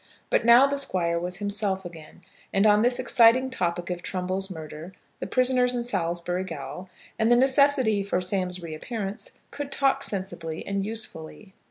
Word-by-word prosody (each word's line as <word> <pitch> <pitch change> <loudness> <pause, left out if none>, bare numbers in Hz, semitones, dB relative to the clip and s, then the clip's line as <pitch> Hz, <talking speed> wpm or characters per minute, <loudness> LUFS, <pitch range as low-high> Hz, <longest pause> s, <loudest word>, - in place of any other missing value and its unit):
But - - +3
now 235 +3 +7
the 280 0 -1
Squire 170 -10 0
was 180 +1 -4
himself 200 -2 -2
again, 165 -3 -11 0.3
and 195 +2 +2
on 210 0 +5
this 245 +2 +3
exciting 255 +2 +4
topic 175 -5 -2
of 175 -1 -4
Trumbull's 185 +1 -3
murder, 160 0 -9 0.3
the - - -4
prisoners 250 -1 +3
in 240 - -1
Salisbury 175 -4 -2
gaol, 165 +1 -8 0.3
and 225 +1 +2
the - - +7
necessity 265 -4 +3
for 195 -2 -1
Sam's 185 -1 -2
reappearance, 195 +6 -6 0.2
could 285 -1 -6
talk 275 -1 +1
sensibly 185 -5 -4
and 200 0 -2
usefully. 205 -3 -7
195 Hz, 160 wpm, -25 LUFS, 175-240 Hz, 0.3 s, now